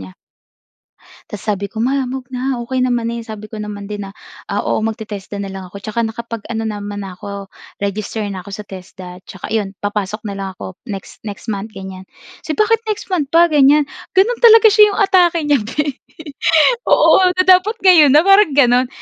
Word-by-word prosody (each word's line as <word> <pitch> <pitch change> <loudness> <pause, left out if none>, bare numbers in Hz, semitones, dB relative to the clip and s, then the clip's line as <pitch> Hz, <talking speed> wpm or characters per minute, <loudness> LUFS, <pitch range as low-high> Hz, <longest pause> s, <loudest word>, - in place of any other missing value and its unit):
niya. 95 -1 -10 1.2
Tapos, 210 - -8
sabi 200 -1 -1
ko, 220 - -7
"Ma, 270 +2 0
'wag 255 0 -6
na 255 0 -2
okay 255 +2 -3
naman 240 -2 0
eh." 235 -1 -5
Sabi 215 -2 -9
ko - - -7
naman 205 -1 -7
din 205 -1 -5
na, - - -12 0.4
ah, - - -1
"Oo, 220 - 0
mag-te-TESDA 210 -2 -5
na 195 - -6
lang 190 0 -7
ako. - - -18
Tsaka 215 +3 -3
nakapag 230 0 -5
ano 225 -1 -3
naman 205 -1 -5
na 185 - -9
ako, 200 0 -8 0.3
register 205 +2 -3
na 190 -3 -6
ako 200 - -12
sa 210 +2 -6
TESDA. 185 -1 -11
Tsaka 190 - -9
ayun, 210 -3 -1
papasok 205 +1 -3
na 200 - -4
lang 195 -1 -5
ako 185 - -8
next 195 -2 -8
next 205 +1 -8
month." 210 +1 -4
Ganyan. 190 -1 -9 0.4
"So - - -4
bakit 450 +1 +2
next 425 - -3
month 325 -8 -2
pa?" 340 +1 +5
Ganyan, 290 -1 +4 0.2
ganun 405 +6 +2
talaga 450 -1 +8
siya, 420 0 +6
'yung 400 - -4
atake 360 -4 +3
niya 290 -3 +3
bhe. 285 +6 -2 1.0
Oo, - - +5 0.2
na 370 - +4
dapat 375 +4 +5
ngayon 320 -7 +7
na 300 - +7
parang 390 -3 +5
ganun. 250 -2 +4
225 Hz, 195 wpm, -17 LUFS, 200-295 Hz, 1.2 s, talaga